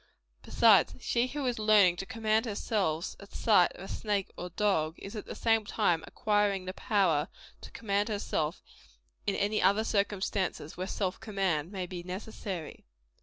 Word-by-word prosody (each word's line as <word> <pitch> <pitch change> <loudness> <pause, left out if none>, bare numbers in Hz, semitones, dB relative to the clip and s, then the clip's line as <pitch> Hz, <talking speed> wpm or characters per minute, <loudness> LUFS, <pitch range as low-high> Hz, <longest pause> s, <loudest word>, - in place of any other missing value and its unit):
Besides, - - +4
she 240 +1 0
who 285 +1 -4
is 245 -3 -1
learning 210 -5 +5
to 195 - -5
command 225 0 0
herself 195 -6 -1
at 200 - -14
sight 200 -6 +4
of - - -10
a - - -7
snake 205 -3 -2
or 180 - -5
a - - -10
dog; 165 -4 0
is 200 +3 -9
at 210 - -6
the - - -6
same 225 -1 +2
time 200 -6 +1
acquiring 205 -3 +1
the 185 - -4
power 175 -8 +1 0.3
to - - -10
command 205 -1 -1
herself 175 -6 -2 0.6
in 200 - +1
any 210 +1 0
other 200 +4 +4
circumstances 200 -6 -1
where 185 +1 -4
self 190 -2 -2
command 195 -7 -1
may 190 -3 -3
be 180 -1 -6
necessary. 185 -2 -6
200 Hz, 170 wpm, -30 LUFS, 180-215 Hz, 0.6 s, learning